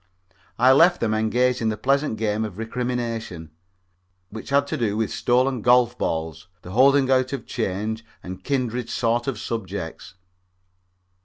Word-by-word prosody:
I 125 +2 +5
left 170 +6 +5
them 110 -2 0
engaged 120 +3 +1
in 110 - +1
the 110 - -2
pleasant 140 -2 0
game 110 0 -1
of 105 -4 -6
recrimination, 115 -7 -4 0.8
which 110 +1 -8
had 140 +1 +3
to - - -3
do 110 -4 -1
with 110 -1 -1
stolen 125 0 +1
golf 120 +1 +4
balls, 80 -3 -3 0.2
the 90 - -9
holding 135 +4 +4
out 130 +1 +2
of 130 -5 -5
change 110 +4 -3 0.2
and 95 0 -8
kindred 125 -3 -2
sordid 120 +1 0
subjects. 110 -4 -6
115 Hz, 145 wpm, -23 LUFS, 110-130 Hz, 0.8 s, I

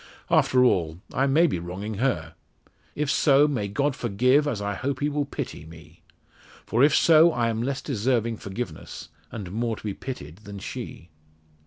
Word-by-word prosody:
"After 125 -1 +4
all, 85 -7 +1
I 135 +2 +2
may 155 +5 +4
be 135 - 0
wronging 95 +5 -6
her. 80 -12 -1 0.6
If 150 -1 0
so, 145 0 +4
may 125 -9 -2
God 135 +7 0
forgive, 125 +6 +2
as 125 -8 -1
I 100 0 -2
hope 130 +5 -3
He 145 - 0
will 145 0 -1
pity 135 - -6
me. 80 +1 -15 0.6
For 115 +4 +2
if 150 +1 +5
so, 165 +1 +6
I 120 -5 0
am 115 0 -2
less 135 +2 -2
deserving 115 -3 0
forgiveness, 100 -5 -7 0.2
and 100 -6 -6
more 115 +2 -1
to - - -14
be 105 -2 -3
pitied 85 - -8
than 100 -1 -10
she." 90 -3 -8
115 Hz, 175 wpm, -25 LUFS, 100-140 Hz, 0.6 s, so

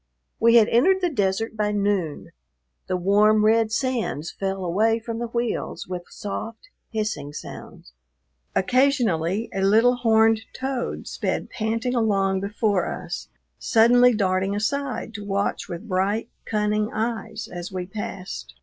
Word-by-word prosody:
We 230 +1 +5
had 225 -2 +7
entered 375 +11 +4
the 355 -2 +1
desert 210 -1 0
by 210 -1 0
noon; 200 -6 -1 0.6
the 185 - 0
warm, 210 +3 +4
red 220 0 +3
sands 230 - -1
fell 195 -1 -3
away 215 +6 +2
from 230 0 -5
the 240 - -2
wheels 235 0 -3
with 180 -1 -5
soft, 225 - -6 0.2
hissing 215 -10 -3
sounds. - - -10 0.6
Occasionally 225 - +2
a 195 - -1
little 225 +6 +4
horned 225 -2 +4
toad 260 -2 -3
sped - - -3
panting 225 +3 -1
along 195 -5 +1
before 200 -1 0
us, - - -5 0.3
suddenly 245 +1 +5
darting 190 -1 +1
aside 250 +2 -2
to 205 -1 -6
watch 200 0 -2
with 175 +6 -6
bright, 200 +4 0 0.2
cunning 210 0 0
eyes 220 -1 -3
as 175 +1 -7
we 185 -1 -4
passed. 195 -1 -7
215 Hz, 135 wpm, -24 LUFS, 195-230 Hz, 0.6 s, had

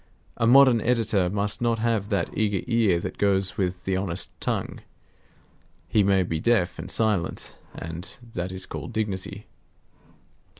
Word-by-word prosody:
A 115 - +1
modern 130 -2 +7
editor 110 -6 +2
must 105 +3 -1
not 115 -1 +2
have 110 -3 0
that 100 - -1
eager 105 -3 0
ear 115 -8 +2
that - - -6
goes 95 -2 +2
with 90 -2 -2
the 95 0 -1
honest 95 -2 -2
tongue. - - -2 1.1
He 105 - +3
may 95 -1 +3
be 80 -2 -2
deaf 110 -2 +1
and - - -6
silent; 105 -7 -1 0.2
and 85 +3 -6 0.2
that 90 +1 -3
is 95 0 -5
called - - -7
dignity. 100 -4 -3
100 Hz, 145 wpm, -25 LUFS, 90-115 Hz, 1.1 s, modern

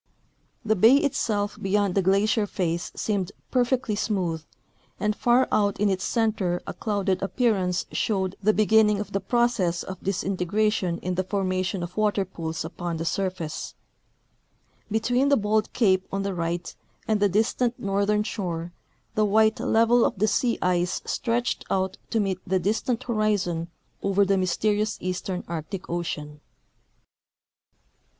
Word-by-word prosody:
" - - -40
The 220 0 +3
bay 225 +7 +7
itself 215 -8 -1
beyond 200 -1 +1
the 195 - +2
glacier 205 +3 +2
face 175 -2 -2
seemed 200 -4 -1 0.2
perfectly 250 -2 +1
smooth, 180 -7 -1 0.6
and 210 0 0
far 245 +3 +3
out 205 -1 +1
in 205 0 +3
its 190 -1 -1
center 210 -6 0
a - - -5
clouded 200 -4 -1
appearance 195 -4 +1
showed 190 -3 -1
the 210 +2 +4
beginning 215 -1 +4
of 210 - -5
the 195 - 0
process 195 -5 +1
of 185 -1 -8
disintegration 195 0 0
in 185 - -1
the 185 +1 0
formation 185 -1 -1
of 175 +1 -7
water 210 -2 +2
pools 165 -3 -5
upon 170 0 -4
the 165 - -3
surface. 185 -4 -3 1.1
Between 245 +5 +1
the 280 - +5
bold 215 0 +1
cape 190 -5 +2
on 195 0 -1
the 200 0 -2
right 170 0 -3 0.3
and 215 -1 +2
the 205 0 +3
distant 230 +4 +1
northern 200 +1 +1
shore 175 -6 -4 0.4
the 215 - +2
white 220 +1 +3
level 230 +1 +4
of - - 0
the 215 +3 +2
sea 235 +3 +1
ice 180 -1 0
stretched 240 +1 -1
out 190 0 -1
to 225 - +1
meet 195 -3 0
the 190 +1 +2
distant 220 +6 -1
horizon 205 -8 0 0.3
over 200 0 +2
the 195 - +2
mj^'sterious 205 +3 +1
eastern 185 0 -3
Arctic 170 +3 -5
ocean." 150 -4 -4
200 Hz, 145 wpm, -25 LUFS, 180-215 Hz, 1.1 s, bay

